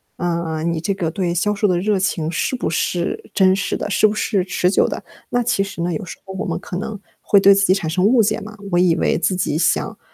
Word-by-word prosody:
啊， 170 Hz, -2 st, -2 dB
你 170 Hz, -1 st, -1 dB
这 195 Hz, +5 st, -1 dB
个 170 Hz, -4 st, -2 dB
对 175 Hz, -1 st, -1 dB
销 210 Hz, +4 st, +1 dB
售 205 Hz, 0 st, +1 dB
的 180 Hz, -2 st, +1 dB
热 205 Hz, 0 st, +1 dB
情 165 Hz, -4 st, -1 dB
是 215 Hz, +9 st, -1 dB
不 250 Hz, -, -2 dB
是 170 Hz, +1 st, -2 dB
真 190 Hz, -1 st, +4 dB
实 195 Hz, +1 st, -1 dB
的， -, -, -4 dB
是 210 Hz, +2 st, +4 dB
不 210 Hz, -, -1 dB
是 195 Hz, -4 st, 0 dB
持 180 Hz, -1 st, 0 dB
久 -, -, +3 dB
的。 -, -, -5 dB, 0.3 s
那 245 Hz, 0 st, +1 dB
其 210 Hz, -4 st, +1 dB
实 195 Hz, -4 st, -7 dB
呢， 175 Hz, 0 st, -1 dB
有 155 Hz, -, -4 dB
时 -, -, -9 dB
候 190 Hz, -, -8 dB
我 190 Hz, -, -4 dB
们 -, -, -2 dB
可 180 Hz, -, -6 dB
能 210 Hz, +1 st, -5 dB, 0.2 s
会 200 Hz, -1 st, +4 dB
对 200 Hz, 0 st, +7 dB
自 195 Hz, 0 st, +3 dB
己 185 Hz, -, +5 dB
产 185 Hz, -5 st, -2 dB
生 180 Hz, +4 st, +1 dB
误 230 Hz, +1 st, +5 dB
解 215 Hz, +1 st, 0 dB
嘛， 215 Hz, +1 st, -10 dB
我 175 Hz, -, +3 dB
以 175 Hz, -2 st, +4 dB
为 -, -, +1 dB
自 185 Hz, +2 st, 0 dB
己 155 Hz, -4 st, -1 dB
想 165 Hz, 0 st, 0 dB
185 Hz, 285 characters per minute, -20 LUFS, 170-200 Hz, 0.3 s, 对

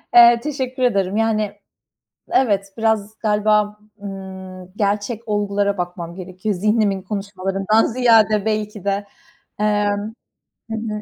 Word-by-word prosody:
Eee, 235 Hz, 0 st, +9 dB
teşekkür 260 Hz, -3 st, -3 dB
ederim. 200 Hz, -4 st, +1 dB
Yani, 215 Hz, -2 st, 0 dB, 0.8 s
evet, 200 Hz, -6 st, +1 dB
biraz 220 Hz, -1 st, 0 dB
galiba, 210 Hz, -1 st, +2 dB, 0.2 s
ımm, 190 Hz, -2 st, -8 dB
gerçek 210 Hz, +3 st, -1 dB
olgulara 205 Hz, -1 st, 0 dB
bakmam 175 Hz, -1 st, -5 dB
gerekiyor 185 Hz, +2 st, -4 dB
zihnimin 210 Hz, 0 st, +1 dB
konuşmalarından 195 Hz, +1 st, 0 dB
ziyade 220 Hz, -4 st, +4 dB
belki 210 Hz, -2 st, -2 dB
de. 200 Hz, 0 st, -1 dB, 0.5 s
Emm. 205 Hz, 0 st, 0 dB, 0.6 s
Hı -, -, -1 dB
hı. 215 Hz, -1 st, -4 dB
210 Hz, 110 wpm, -20 LUFS, 195-220 Hz, 0.8 s, Eee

